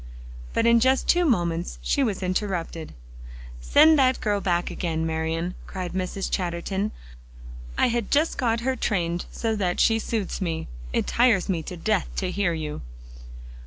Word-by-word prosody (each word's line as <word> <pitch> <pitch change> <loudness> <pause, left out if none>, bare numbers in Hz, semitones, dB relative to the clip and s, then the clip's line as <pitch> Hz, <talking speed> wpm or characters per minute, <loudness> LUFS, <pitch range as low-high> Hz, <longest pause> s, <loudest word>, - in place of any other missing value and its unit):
But 230 - +1
in 235 0 +6
just 260 +2 +2
two 350 0 +4
moments 175 - 0
she 285 - +1
was 205 -6 -1
interrupted. 180 -4 -3 0.6
"Send 305 - +5
that 260 -1 +3
girl 205 -2 0
back 175 -2 0
again, 160 -2 -2
Marian," 165 +2 -2
cried 185 -2 -5
Mrs. 185 +1 -2
Chatterton. 190 +3 -2 0.9
"I - - +4
had 235 -2 -1
just 305 +3 +2
got 230 -3 +1
her 260 +2 0
trained 175 -7 -1
so 225 -1 -1
that 185 -4 -1
she 225 0 +4
suits 215 -3 -3
me. 165 -3 -2 0.2
It - - 0
tires 230 -6 +3
me 175 -4 0
to 175 +3 -7
death 210 +2 0
to 185 -2 -1
hear 190 -3 0
you." 155 -2 -4
190 Hz, 160 wpm, -25 LUFS, 170-230 Hz, 0.9 s, in